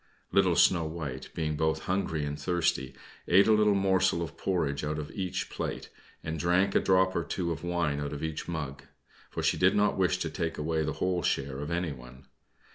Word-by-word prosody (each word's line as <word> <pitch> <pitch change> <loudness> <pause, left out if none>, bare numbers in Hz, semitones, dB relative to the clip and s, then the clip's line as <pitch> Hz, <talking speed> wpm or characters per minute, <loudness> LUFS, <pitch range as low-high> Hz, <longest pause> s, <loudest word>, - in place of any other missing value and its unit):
Little - - +4
Snow 85 -3 +4
White, 75 -5 -5
being 75 -2 -1
both 80 +1 0
hungry 85 -5 -1
and 75 0 -4
thirsty, 85 -7 0 0.3
ate 95 +3 +6
a 110 - +4
little 105 -1 +4
morsel 95 -3 +2
of 80 - -7
porridge 75 -7 -1
out 75 +1 -2
of 75 -1 -5
each 95 -3 -3
plate, - - -4 0.3
and 80 0 -4
drank 90 +4 +2
a - - +5
drop 95 0 +3
or 85 - +1
two 85 0 -2
of 80 0 -5
wine 85 -4 0
out 70 -1 -3
of 75 +1 -5
each 80 -1 -4
mug, 75 -5 -4 0.5
for - - -4
she - - +2
did 95 +3 +4
not 105 0 +2
wish 90 -1 +2
to 80 -3 -3
take 80 +1 -3
away 80 +1 -1
the 75 0 -2
whole 90 -1 0
share 70 -3 -1
of 75 +1 -4
anyone. 65 -7 -5
80 Hz, 200 wpm, -29 LUFS, 75-90 Hz, 0.5 s, ate